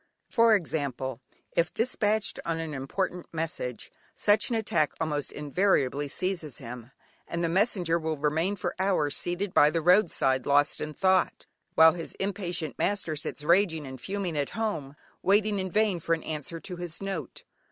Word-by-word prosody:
For 230 Hz, -1 st, +5 dB
example, 135 Hz, -, -3 dB, 0.3 s
if 170 Hz, +1 st, +1 dB
despatched 220 Hz, -3 st, 0 dB
on 165 Hz, -1 st, -2 dB
an 160 Hz, -2 st, -4 dB
important 175 Hz, +6 st, -3 dB
message, 155 Hz, -7 st, -4 dB, 0.2 s
such 205 Hz, 0 st, +3 dB
an 235 Hz, -, 0 dB
attack 170 Hz, -9 st, +1 dB
almost 150 Hz, -3 st, -2 dB
invariably 145 Hz, -3 st, +1 dB
seizes 170 Hz, -2 st, -3 dB
him, 120 Hz, -1 st, -8 dB, 0.4 s
and 170 Hz, 0 st, -3 dB
the -, -, +2 dB
messenger 180 Hz, -3 st, +2 dB
will 160 Hz, -1 st, -2 dB
remain 160 Hz, +7 st, 0 dB
for 190 Hz, -, -3 dB
hours, 185 Hz, -7 st, +2 dB
seated 180 Hz, +2 st, -1 dB
by 145 Hz, -, +6 dB
the 165 Hz, -, 0 dB
road 180 Hz, +2 st, +5 dB
side 130 Hz, -1 st, +1 dB
lost 145 Hz, +1 st, +3 dB
in 155 Hz, -1 st, -4 dB
thought, 185 Hz, -1 st, +2 dB, 0.3 s
while 160 Hz, 0 st, +8 dB
his 165 Hz, -1 st, -6 dB
impatient 180 Hz, -6 st, -3 dB
master 200 Hz, -6 st, 0 dB
sits 150 Hz, 0 st, -4 dB
raging 170 Hz, -2 st, +3 dB
and 130 Hz, -2 st, -9 dB
fuming 195 Hz, -2 st, -3 dB
at 145 Hz, -2 st, -1 dB
home, 160 Hz, -11 st, -2 dB, 0.3 s
waiting 205 Hz, +1 st, +3 dB
in 190 Hz, 0 st, -2 dB
vain 210 Hz, -2 st, +1 dB
for 165 Hz, +1 st, +1 dB
an 165 Hz, -, -10 dB
answer 155 Hz, +2 st, -5 dB
to 180 Hz, +1 st, -7 dB
his 175 Hz, -2 st, -3 dB
note. 195 Hz, -3 st, -5 dB
170 Hz, 165 wpm, -28 LUFS, 150-195 Hz, 0.4 s, while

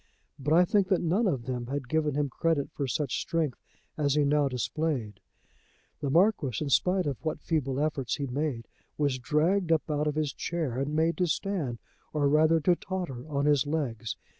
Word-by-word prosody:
But 145 Hz, +3 st, 0 dB
I 180 Hz, +1 st, +6 dB
think 200 Hz, +1 st, +2 dB
that 190 Hz, -3 st, +1 dB
none 190 Hz, +7 st, +2 dB
of 130 Hz, -10 st, -1 dB
them 125 Hz, -1 st, -3 dB
had 135 Hz, -1 st, -3 dB
given 150 Hz, 0 st, 0 dB
him 145 Hz, 0 st, +1 dB
credit 145 Hz, +2 st, 0 dB
for 140 Hz, -, -2 dB
such 140 Hz, +1 st, -1 dB
strength 160 Hz, -6 st, -1 dB, 0.4 s
as 140 Hz, -2 st, +2 dB
he 150 Hz, -1 st, +3 dB
now 145 Hz, 0 st, +3 dB
displayed. 125 Hz, -4 st, -2 dB, 0.8 s
The 145 Hz, -, -2 dB
Marquis, 165 Hz, -, +3 dB
in 150 Hz, -, -2 dB
spite 180 Hz, +5 st, +3 dB
of 140 Hz, -2 st, -3 dB
what 155 Hz, -, -2 dB
feeble 135 Hz, -5 st, -1 dB
efforts 145 Hz, -4 st, -1 dB
he 140 Hz, -, -3 dB
made, 135 Hz, -3 st, -2 dB, 0.3 s
was 140 Hz, -3 st, 0 dB
dragged 165 Hz, +8 st, +1 dB
up 160 Hz, -1 st, +1 dB
out 150 Hz, 0 st, 0 dB
of 150 Hz, -, -1 dB
his 150 Hz, -3 st, -1 dB
chair 155 Hz, -8 st, -2 dB
and 140 Hz, +3 st, -2 dB
made 160 Hz, +2 st, +2 dB
to 180 Hz, -, +2 dB
stand, 160 Hz, -8 st, -2 dB, 0.4 s
or 145 Hz, -2 st, +2 dB
rather 155 Hz, +3 st, +4 dB
to 175 Hz, +4 st, +4 dB
totter, 170 Hz, -9 st, -5 dB
on 140 Hz, -1 st, 0 dB
his 145 Hz, -3 st, +3 dB
legs. 125 Hz, -8 st, -2 dB
150 Hz, 190 wpm, -28 LUFS, 135-165 Hz, 0.8 s, I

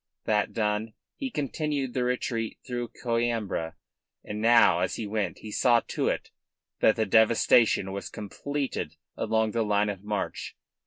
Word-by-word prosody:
That 105 Hz, -1 st, +1 dB
done, 105 Hz, 0 st, -1 dB, 0.2 s
he 270 Hz, -2 st, -4 dB
continued 145 Hz, -, -2 dB
the 125 Hz, -, 0 dB
retreat 125 Hz, -2 st, -2 dB
through 120 Hz, -2 st, -3 dB, 0.2 s
Coimbra. 115 Hz, -8 st, -1 dB, 0.5 s
And 105 Hz, 0 st, -5 dB
now 115 Hz, -6 st, +6 dB
as 90 Hz, -, 0 dB
he 110 Hz, -, -4 dB
went 105 Hz, 0 st, -2 dB
he 110 Hz, -, -9 dB
saw 120 Hz, +1 st, +4 dB
to -, -, -1 dB
it -, -, -2 dB, 0.5 s
that 110 Hz, -, +5 dB
the 110 Hz, -, +1 dB
devastation 110 Hz, -1 st, +4 dB
was 100 Hz, 0 st, -5 dB
completed 140 Hz, +6 st, -4 dB, 0.2 s
along 110 Hz, -1 st, +1 dB
the 115 Hz, -, 0 dB
line 105 Hz, -1 st, +2 dB
of 100 Hz, -1 st, -5 dB
march. 105 Hz, -1 st, -4 dB
110 Hz, 150 wpm, -27 LUFS, 105-120 Hz, 0.5 s, now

